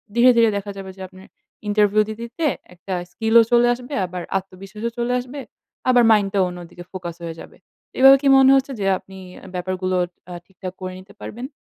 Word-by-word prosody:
ধীরে, 240 +2 +6
ধীরে 230 -1 +5
দেখা 200 0 -5
যাবে 195 -1 -7
যে 190 - -12
আপনার 190 +1 -16 0.4
ইন্টারভিউ 210 0 +3
দিতে, 220 +1 -7
দিতে 240 +8 -4 0.3
একটা 180 +2 -7 0.2
স্কিলও 225 +3 +4
চলে 240 0 +5
আসবে, 250 +3 -9
আবার 180 0 -6 0.2
আত্মবিশ্বাসও 195 +4 -7
চলে 240 +1 0
আসবে। 255 +3 -8 0.5
আবার 245 -1 +5
মাইন্ডটাও 200 -2 +3
অন্যদিকে 175 0 -10
ফোকাস 180 -3 -6
হয়ে 165 -1 -5
যাবে। - - -13 0.4
এভাবে 270 +1 +9
কি 285 - 0
মনে 265 0 +6
হচ্ছে 270 +1 +1
যে 195 - -2
আপনি 190 0 -14 0.4
ব্যাপারগুলো 185 +1 -2 0.4
আ - - -6
ঠিকঠাক 185 -1 -9
করে 185 0 -5
নিতে 195 +2 -16
পারবেন? 245 +5 -7
200 Hz, 180 wpm, -21 LUFS, 185-240 Hz, 0.5 s, এভাবে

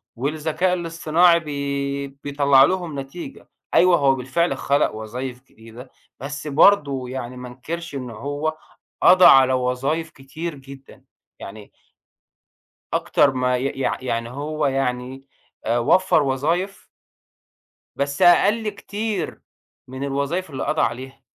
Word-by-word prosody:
والذكاء 155 +7 -1
الاصطناعي 170 0 +2
بي 140 -2 -3
بيطلع 140 0 +3
لهم 170 -2 -1
نتيجة. 135 +6 -9 0.2
أيوه، 180 -1 +5
هو 135 -3 +3
بالفعل 135 +4 -1
خلق 140 -4 +1
وظايف 125 +4 -6
جديدة، 115 +3 -14 0.3
بس 145 +3 -6
برضو 140 -4 +3
يعني 125 -1 -6
ما 125 0 -8
انكرش 155 +6 -7
إن 130 -2 -5
هو 145 +7 -4 0.4
قضى 185 0 +7
على 130 -1 +7
وظايف 130 +6 -1
كتير 155 +4 -7
جدًا. 135 0 -14 0.4
يعني 105 +1 -10 1.2
أكتر 145 - +2
ما 125 -1 0
ي 125 - -3 0.2
يع - - -1
يعني 115 -2 -2
هو 150 +4 -3
يعني 135 0 -3 0.4
آآ، 115 +2 +1
وفر 170 +7 +3
وظايف 165 +9 -2 1.1
بس 140 +4 -2
أقل 205 +5 +4
كتير 205 -1 -4 0.5
من 130 +2 -6
الوظايف 140 +6 -2
اللي 135 - -4
قضى 155 - 0
عليها. 130 +3 -4
140 Hz, 120 wpm, -22 LUFS, 130-165 Hz, 1.2 s, قضى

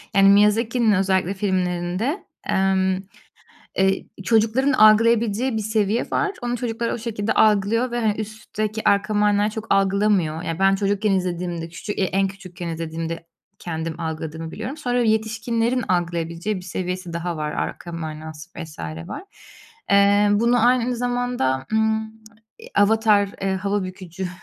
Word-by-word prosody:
Yani, 195 0 +6
Miyazaki'nin 220 +3 +4
özellikle 190 -1 +1
filmlerinde, 185 - -1 0.3
emm, 190 -1 +2 0.8
eee, 190 0 +2 0.2
çocukların 230 +6 +2
algılayabileceği 230 +1 +4
bir - - -1
seviye 215 +1 0
var, 405 - +1
onu 245 0 -2
çocuklar 235 -1 -2
o - - -2
şekilde 220 -2 -2
algılıyor 220 +4 +3
ve 240 - -1
hani, 220 -3 +2
üstteki, 215 0 -2
arka 200 +1 +1
mana 205 0 +3
çok 220 +1 -7
algılamıyor. 195 -5 +2
Ya, 165 +1 -3
ben 195 0 +4
çocukken 200 +1 0
izlediğimde 175 -3 -2
küçük 205 +5 -6
eee, 195 - +2
en 195 +2 +1
küçükken 185 -2 -8
izlediğimde 165 0 -4 0.3
kendim 165 -1 -4
algıladığımı 160 0 -5
biliyorum. 230 - -6
Sonra 245 -4 0
yetişkinlerin 225 +2 0
algılayabileceği 170 +2 -1
bir 185 - -6
seviyesi 180 -1 -4
daha 170 0 -3
var, 150 0 -2
arka 175 - -4
manası, 155 -1 -7
vs. 160 -2 -8 0.3
var. - - -6 0.7
Eee, 200 +1 +5
bunu 235 +3 +3
aynı 250 0 +2
zamanda, 245 - -1
ımm, 220 0 +1 0.5
eee, 460 +2 -12
Avatar, 210 -1 +4
eee, 195 0 0
hava 200 +1 -1
bükücü, 185 0 -6
200 Hz, 140 wpm, -22 LUFS, 180-220 Hz, 0.8 s, Yani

